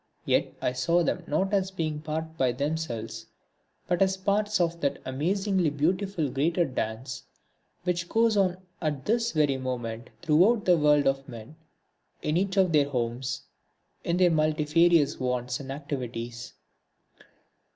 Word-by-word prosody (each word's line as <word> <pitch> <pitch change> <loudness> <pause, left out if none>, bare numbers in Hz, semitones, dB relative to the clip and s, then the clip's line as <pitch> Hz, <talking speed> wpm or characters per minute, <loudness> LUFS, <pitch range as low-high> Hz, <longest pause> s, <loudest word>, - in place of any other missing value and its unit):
Yet - - +1
I 125 - +1
saw 165 +8 +2
them - - -1
not 190 +7 0
as 195 -1 +2
being 160 -5 -3
apart 160 +1 -4
by 130 -5 +1
themselves, 120 -6 -3 0.6
but 175 0 0
as 190 0 +3
parts 205 +2 +1
of 170 -1 0
that 140 -1 0
amazingly 180 +6 0
beautiful 170 +3 0
greater 165 +6 +1
dance 120 -2 -4 0.6
which 175 -1 -1
goes 225 -1 +3
on 185 -3 +2 0.2
at 150 -5 -2
this 230 +1 +1
very 145 -4 +2
moment 120 -3 -4
throughout 185 +8 +4
the 180 - +6
world 150 -2 +4
of 135 0 0
men, 115 +6 -10 0.7
in 150 - 0
each 190 +2 0
of 185 -3 +4
their 145 -2 +3
homes, 125 0 -2 0.6
in 170 - 0
their 180 -1 +5
multifarious 155 0 +3
wants 125 +1 -1
and 135 -1 -7
activities. 120 -4 -5
155 Hz, 140 wpm, -27 LUFS, 130-180 Hz, 0.7 s, the